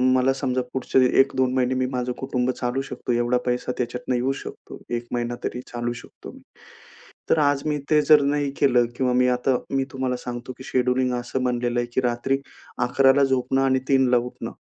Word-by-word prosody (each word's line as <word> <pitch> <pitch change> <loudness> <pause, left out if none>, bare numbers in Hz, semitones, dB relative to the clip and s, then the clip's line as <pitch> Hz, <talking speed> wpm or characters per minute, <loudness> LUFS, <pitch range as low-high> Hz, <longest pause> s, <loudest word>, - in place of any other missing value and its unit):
मला 130 +1 +3
समजा 130 -1 -1
पुढचे 130 0 +1 0.2
1-2 130 -1 +3
महिने 130 0 +1
मी 130 0 +1
माझं 125 0 -1
कुटुंब 130 -2 -1
चालू 125 +1 -2
शकतो 125 -2 -5
एवढा 120 +1 +2
पैसा 125 0 -1
त्याच्यातनं 125 +1 -2
येऊ 125 +2 +1
शकतो. - - -10
1 120 0 -3
महिना 120 0 -2
तरी 125 - -3
चालवू 120 0 -2
शकतो 115 - -11
मी. - - -14 0.9
तर 160 - +4
आज 145 -2 +2
मी 150 -1 0
ते 150 -1 +5
जर 150 -2 +8
नाही 145 0 0
केलं 125 -4 +4
किंवा 125 0 +1
मी 125 0 +3
आता 125 +1 +1 0.2
मी 135 - +2
तुम्हाला 130 -1 -2
सांगतो 125 +1 -6
की 130 - -10
शेड्यूलिंग 125 0 +1
असं 125 +2 -3
बनलेलं 120 -1 0
आहे 120 - -1
की - - +2
रात्री 125 +2 0 0.5
11:00 135 +1 +4
ला 140 - +4
झोपणं 135 0 +1
आणि 130 -1 +2
3:00 135 -1 +4
ला 125 - +5
उठणं. 120 +1 -5
125 Hz, 195 wpm, -23 LUFS, 125-135 Hz, 0.9 s, जर